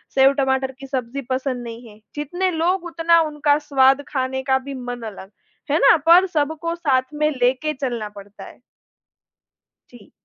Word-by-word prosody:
सेव-टमाटर 265 -1 +2
की 270 - -9
सब्ज़ी 260 0 -4
पसंद 255 -1 -2
नहीं 235 0 -9
है। 210 - -17 0.2
जितने 350 +6 -2
लोग, 350 +2 0
उतना 335 0 +2
उनका 295 -1 +1
स्वाद, 270 0 +4
खाने 265 -1 -2
का 265 - +4
भी 275 +1 -8
मन 245 -2 -6
अलग, 195 0 -12 0.4
है 300 - +3
ना, - - +6
पर 345 +3 +7
सबको 320 +3 -1
साथ 270 -5 0
में 300 0 +1
लेके 260 +3 0
चलना 240 -6 -4
पड़ता 205 0 -13
है। - - -14 1.3
जी। 240 -4 -17
270 Hz, 160 wpm, -21 LUFS, 255-305 Hz, 1.3 s, पर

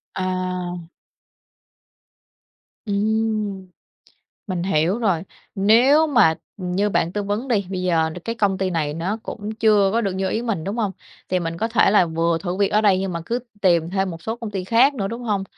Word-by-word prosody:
À. 185 -1 -2 2.1
Ừm, 210 -1 -1 0.8
mình 180 -3 -2
hiểu 180 +3 +1
rồi. 190 -8 +1 0.3
Nếu 245 +10 +5
mà, 235 - +4 0.2
ừm, 180 -2 -4
như 200 +3 +1
bạn 170 -2 0
tư 205 - -2
vấn 210 +6 -3
đi, 205 -5 +1
bây 185 -1 -3
giờ, 170 -3 +2
ờ, 160 - -1
cái 230 - -2
công 200 -4 +1
ty 190 -1 0
này 155 -4 -1
nó 175 +6 -2
cũng 210 0 -6
chưa 210 -3 +3
có 230 - +2
được 195 -4 -1
như 190 0 -1
ý 220 - -1
mình, 210 -9 -2
đúng 200 +3 -3
hông? 210 -5 -1 0.4
Thì 185 - +1
mình 165 0 -4
có 225 - 0
thể 230 -3 +3
là 195 -3 +4
vừa 165 0 0
thử 180 0 -4
việc 200 0 +2
ở 210 - +2
đây 200 -3 +4
nhưng 190 -1 -2
mà 170 - -3
cứ 235 - -1 0.2
tìm 170 -3 +3
thêm 190 0 0
một 165 0 -9
số 225 +1 -3
công 230 -3 -6
ty 190 -3 -4
khác 240 +8 +4
nữa, 200 -6 -2
đúng 230 +3 -6
hông? 205 -4 -1
195 Hz, 205 wpm, -22 LUFS, 180-220 Hz, 2.1 s, Nếu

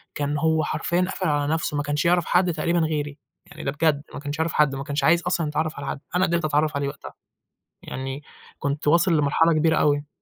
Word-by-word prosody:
كان 145 0 -1
هو 160 +1 +2
حرفيًا 170 +3 -1
قافل 185 0 -2
على 145 0 +1
نَفْسه 160 -2 -1
ما 145 - 0
كانش 145 +1 -1
يعرف 175 0 +3
حد 180 -1 +2
تقريبًا 170 +2 0
غيري، 150 -3 -2 0.3
يعني 150 +2 -11
ده 135 - -1
بجد 145 0 +1
ما - - -6
كانش 145 +1 -5
يعرف 160 0 0
حد 150 -2 +3
ما 135 - -4
كانش 145 +1 -2
عايز 170 +1 +4
أصلًا 175 -2 -1
يتعرّف 155 +1 -2
على 145 - -6
حد، - - -3 0.2
أنا 185 +1 +4
قدرت 170 -2 0
أتعرّف 150 0 +1
عليه 140 0 -1
وقتها، 140 - -8 0.7
يعني، 135 +2 -6 0.4
كُنت 145 +1 -2
وأصل 170 +2 +4
لمرحلة 150 +3 +3
كبيرة 160 +1 +2
أوي. 145 0 +2
155 Hz, 215 wpm, -24 LUFS, 145-165 Hz, 0.7 s, عايز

